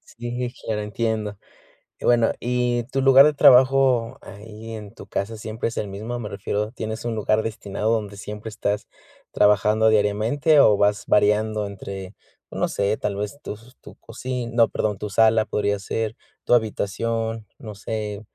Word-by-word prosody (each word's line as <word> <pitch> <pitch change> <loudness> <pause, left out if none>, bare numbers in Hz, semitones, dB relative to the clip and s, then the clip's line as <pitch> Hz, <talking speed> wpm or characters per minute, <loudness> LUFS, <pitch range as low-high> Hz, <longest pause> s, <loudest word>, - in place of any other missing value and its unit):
Sí, 120 +1 -4
claro, 110 -1 -2
entiendo. 105 -1 -2 0.6
Y - - -12
bueno, 120 -2 +4
¿y 125 0 0
tu 135 - 0
lugar 135 0 +8
de 150 - +3
trabajo 130 -3 +5
ahí 110 +3 -10
en 105 -1 -8
tu - - -12
casa 110 +3 -3
siempre 110 +1 -4
es 115 - -10
el 105 - -2
mismo? 110 +5 -5
Me 110 - -5
refiero, 105 +2 -3
¿tienes 110 -1 -5
un 115 -1 -2
lugar 110 +1 +1
destinado 105 0 -2
donde 105 -3 -3
siempre 105 +2 -7
estás 105 -1 -3 0.4
trabajando 105 +2 +3
diariamente 110 +8 +3
o 105 - +6
vas 105 +1 +1
variando 105 +1 +2
entre, 100 -1 -8 0.4
no - - -1
sé, 100 +2 -1
tal 100 - -3
vez 105 +7 -5
tus 115 +5 -10
tu - - -14
cocina, 125 +1 -6
no, 115 -1 +5
perdón, 105 -2 -2
tu 105 +2 -5
sala 110 +1 +4
podría 100 -1 -1
ser, 110 +3 -3 0.3
tu - - +1
habitación, 115 0 -2
no 110 -6 -9
sé, 105 0 -5
110 Hz, 165 wpm, -23 LUFS, 105-115 Hz, 0.6 s, lugar